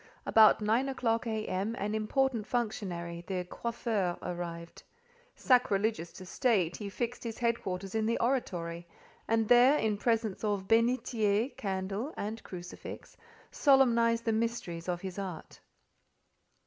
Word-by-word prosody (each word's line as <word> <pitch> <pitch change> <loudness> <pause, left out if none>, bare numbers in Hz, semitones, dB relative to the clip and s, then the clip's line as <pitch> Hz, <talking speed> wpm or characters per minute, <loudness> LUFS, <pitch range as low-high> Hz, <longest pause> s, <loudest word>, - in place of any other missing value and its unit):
About 220 -1 +6
nine 230 +6 +1
o'clock 230 -3 0
A.M., 215 -1 -2
an 210 +2 -2
important 225 +1 0
functionary, 180 -8 -3
the 185 -2 -2
"coiffeur," 215 -4 -2
arrived. 170 -1 -6 0.5
Sacrilegious 215 -7 +2
to 185 - -10
state, 190 - +1
he 205 -2 -5
fixed 240 +4 -4
his 230 -2 -5
head 235 -1 0
quarters 190 +1 -5
in 220 -1 0
the 230 - +1
oratory, 175 -9 -2 0.4
and 225 -1 +2
there, 245 +5 +6
in 215 -5 0
presence 225 -4 0
of 205 -3 -1
bénitier, 230 0 +2
candle, 195 +7 -3
and 220 +2 -4
crucifix, 175 -1 -9 0.4
solemnised 235 -5 +4
the 225 - +2
mysteries 220 -7 -2
of 175 -1 -2
his 190 0 -6
art. 185 -4 -7
215 Hz, 130 wpm, -31 LUFS, 185-235 Hz, 0.5 s, About